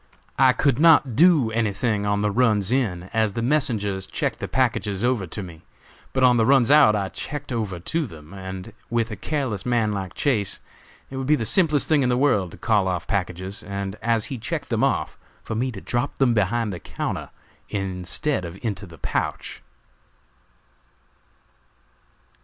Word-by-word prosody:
I 130 Hz, -1 st, +6 dB
could 140 Hz, -1 st, +1 dB
not 150 Hz, -7 st, +5 dB
do 155 Hz, -7 st, +5 dB
anything 110 Hz, -1 st, 0 dB
on 100 Hz, 0 st, +1 dB
the 105 Hz, 0 st, +1 dB
runs 110 Hz, -3 st, +2 dB
in, 105 Hz, -10 st, 0 dB
as 110 Hz, -2 st, +1 dB
the 115 Hz, -, -2 dB
messengers 110 Hz, -9 st, 0 dB
checked -, -, -2 dB
the -, -, -4 dB
packages 110 Hz, -6 st, 0 dB
over 120 Hz, -6 st, +1 dB
to 100 Hz, +4 st, -5 dB
me, 85 Hz, -3 st, -11 dB, 0.5 s
but 130 Hz, -, 0 dB
on 125 Hz, -1 st, +6 dB
the 115 Hz, -, +3 dB
runs 135 Hz, -2 st, +5 dB
out 145 Hz, -8 st, +7 dB
I 100 Hz, -2 st, -1 dB
checked 145 Hz, -2 st, -6 dB
over 105 Hz, -7 st, -2 dB
to 160 Hz, -, -1 dB
them, 80 Hz, -2 st, -13 dB
and, 95 Hz, +2 st, -7 dB, 0.2 s
with 115 Hz, -1 st, 0 dB
a -, -, -3 dB
careless 115 Hz, -, -2 dB
man 120 Hz, -3 st, +1 dB
like 95 Hz, -3 st, -4 dB
Chase, 110 Hz, -9 st, 0 dB, 0.5 s
it 135 Hz, -, -5 dB
would 135 Hz, -1 st, -3 dB
be 150 Hz, -, +5 dB
the 115 Hz, -, -2 dB
simplest 155 Hz, -, +3 dB
thing 155 Hz, -3 st, +3 dB
in 125 Hz, -, +2 dB
the 125 Hz, -, +2 dB
world 125 Hz, -10 st, +2 dB
to -, -, -11 dB
call 105 Hz, -4 st, +2 dB
off 90 Hz, -2 st, -2 dB
packages, 95 Hz, 0 st, -3 dB
and, 100 Hz, 0 st, -5 dB
as 115 Hz, -2 st, +1 dB
he 130 Hz, -, -5 dB
checked -, -, -4 dB
them -, -, 0 dB
off, -, -, 0 dB, 0.2 s
for -, -, -5 dB
me 125 Hz, +4 st, -1 dB
to 100 Hz, -5 st, -8 dB
drop 120 Hz, +4 st, -2 dB
them 130 Hz, -3 st, +3 dB
behind 110 Hz, 0 st, 0 dB
the 90 Hz, -, -6 dB
counter -, -, -4 dB, 0.4 s
instead 95 Hz, +5 st, -2 dB
of 85 Hz, +1 st, -7 dB
into 100 Hz, -4 st, -3 dB
the 85 Hz, -1 st, -13 dB
pouch." -, -, -3 dB
110 Hz, 180 wpm, -23 LUFS, 95-130 Hz, 0.5 s, out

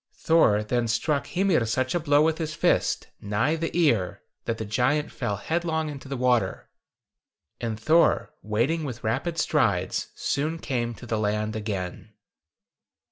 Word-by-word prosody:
Thor 110 Hz, -11 st, +3 dB
then 120 Hz, +2 st, 0 dB
struck 140 Hz, +6 st, 0 dB
Hymir 185 Hz, -7 st, +2 dB
such 130 Hz, +3 st, 0 dB
a 175 Hz, -, +1 dB
blow 145 Hz, -2 st, +4 dB
with 160 Hz, +1 st, +1 dB
his 155 Hz, -1 st, -3 dB
fist, -, -, +1 dB
nigh 105 Hz, +9 st, +1 dB
the 165 Hz, 0 st, -2 dB
ear, 115 Hz, -, +2 dB, 0.2 s
that 115 Hz, -, -1 dB
the 110 Hz, -, -4 dB
giant 130 Hz, +8 st, +1 dB
fell 105 Hz, -5 st, -2 dB
headlong 160 Hz, -, -1 dB
into 140 Hz, -2 st, -8 dB
the 135 Hz, 0 st, -4 dB
water, 125 Hz, -2 st, 0 dB, 0.9 s
and 115 Hz, -2 st, -3 dB
Thor, 155 Hz, +3 st, +3 dB
wading 120 Hz, +10 st, 0 dB
with 125 Hz, -5 st, -6 dB
rapid 135 Hz, +10 st, -1 dB
strides, 100 Hz, -, +1 dB
soon 155 Hz, +4 st, -1 dB
came 120 Hz, -6 st, -2 dB
to 120 Hz, -, -11 dB
the 115 Hz, -2 st, -1 dB
land 105 Hz, +1 st, -1 dB
again." 100 Hz, -5 st, -4 dB
125 Hz, 150 wpm, -26 LUFS, 110-155 Hz, 0.9 s, blow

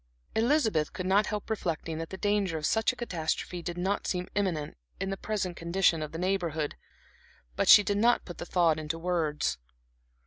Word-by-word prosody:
Elizabeth 220 Hz, -, +2 dB
could 185 Hz, -, -4 dB
not 200 Hz, +3 st, +3 dB
help 210 Hz, -1 st, -3 dB
reflecting 165 Hz, -6 st, -3 dB
that 165 Hz, -, -5 dB
the 190 Hz, -, -7 dB
danger 205 Hz, -4 st, 0 dB
of 155 Hz, -, -3 dB
such 220 Hz, +6 st, +2 dB
a -, -, -11 dB
catastrophe 175 Hz, -5 st, -3 dB
did 175 Hz, 0 st, -5 dB
not 190 Hz, +3 st, -1 dB
seem 180 Hz, -1 st, -2 dB
imminent, 180 Hz, -8 st, -1 dB, 0.2 s
in 195 Hz, 0 st, -2 dB
the -, -, -1 dB
present 195 Hz, -3 st, -3 dB
condition 170 Hz, -1 st, +2 dB
of 155 Hz, -, -4 dB
the 160 Hz, -, -6 dB
Neighborhood; 170 Hz, -5 st, -1 dB, 0.8 s
but -, -, +1 dB
she 210 Hz, -, +10 dB
did 200 Hz, +1 st, 0 dB
not 240 Hz, +3 st, +3 dB
put 175 Hz, -, -9 dB
the -, -, -5 dB
thought 165 Hz, -3 st, +3 dB
into 155 Hz, +1 st, -3 dB
words. 165 Hz, -, -1 dB
180 Hz, 185 wpm, -29 LUFS, 165-205 Hz, 0.8 s, she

